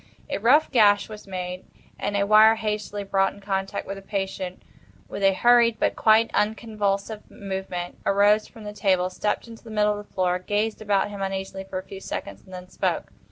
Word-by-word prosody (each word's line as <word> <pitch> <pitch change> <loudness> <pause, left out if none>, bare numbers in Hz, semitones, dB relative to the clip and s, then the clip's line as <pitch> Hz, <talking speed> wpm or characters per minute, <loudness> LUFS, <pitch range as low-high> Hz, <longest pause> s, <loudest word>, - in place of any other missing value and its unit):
A 280 - -1
rough 260 +9 +4
gash 205 -5 +4
was 210 -1 -10
made, 180 -1 -5 0.4
and 205 - -1
a 200 - +2
wire 215 +2 +7
hastily 210 -2 -3
brought 195 0 +1
in - - -14
contact, 195 -1 -3
when 195 - -5
the 195 - -9
patient, 195 -2 -4 0.4
with - - -6
a 195 0 +4
hurried 235 0 +4
but - - +1
quite 220 +1 +4
unconvulsive 210 -1 -1
movement, 190 -3 -5
arose 205 +2 +3
from 225 -3 -14
the 210 0 -7
table, 185 -3 +1
stepped 210 +5 -2
into 230 -1 -12
the 230 - -12
middle 210 -1 +1
of 205 - -11
the - - -32
floor, 180 -1 +1
gazed 210 +4 -2
about 205 -1 +1
him 200 -1 -7
uneasily 195 0 -4
for 190 - -6
a 185 - -5
few 195 - -9
seconds, 100 - -6
and 190 - -18
then—spoke. 180 0 -3
200 Hz, 195 wpm, -24 LUFS, 190-215 Hz, 0.4 s, wire